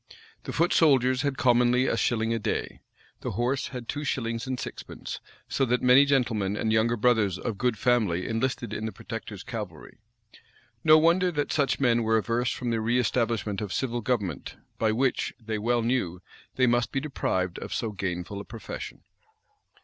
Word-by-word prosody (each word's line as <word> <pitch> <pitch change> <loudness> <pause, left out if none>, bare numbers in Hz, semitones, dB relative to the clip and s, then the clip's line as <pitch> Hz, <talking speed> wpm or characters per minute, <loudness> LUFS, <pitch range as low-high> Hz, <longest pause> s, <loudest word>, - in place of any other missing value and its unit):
[v] - - -15 0.3
The - - -5
foot 170 +2 +2
soldiers 130 -5 +4
had 140 -2 -1
commonly 125 0 +4
a - - +1
shilling 115 -1 +1
a 115 - -1
day.[v*] 105 - -3 0.4
The - - -4
horse 130 +3 0
had 125 -3 -7
two 145 - -3
shillings 115 -3 -2
and 130 -1 -2
sixpence; - - -7 0.3
so 135 - 0
that 125 0 0
many 125 +3 +7
gentlemen 115 -8 +1
and 110 0 0
younger 115 +2 +2
brothers 110 -5 +2
of 100 +1 -4
good 125 -3 +1
family 105 -9 +1
enlisted 120 +1 -2
in 110 +1 -3
the - - -4
protector's 105 -1 -7
cavalry.[v] 105 - -7 0.8
No 155 0 +8
wonder 175 +3 +4
that 145 -1 -1
such 140 -3 +1
men 120 -3 +3
were 110 0 +2
averse 120 +3 0
from 120 -2 -3
the 115 - +1
reëstablishment 115 -2 0
of 105 -3 -4
civil 120 0 -1
government, 105 - -2 0.2
by 110 -1 +2
which, 130 +4 0
they 110 -2 -4
well 120 +2 +1
knew, 115 -8 0 0.4
they 130 - +3
must 120 -1 +2
be 135 - 0
deprived 95 - -2
of - - -7
so 115 - -2
gainful 95 0 -4
a - - -7
profession. 110 +2 -8
120 Hz, 180 wpm, -27 LUFS, 110-130 Hz, 0.8 s, No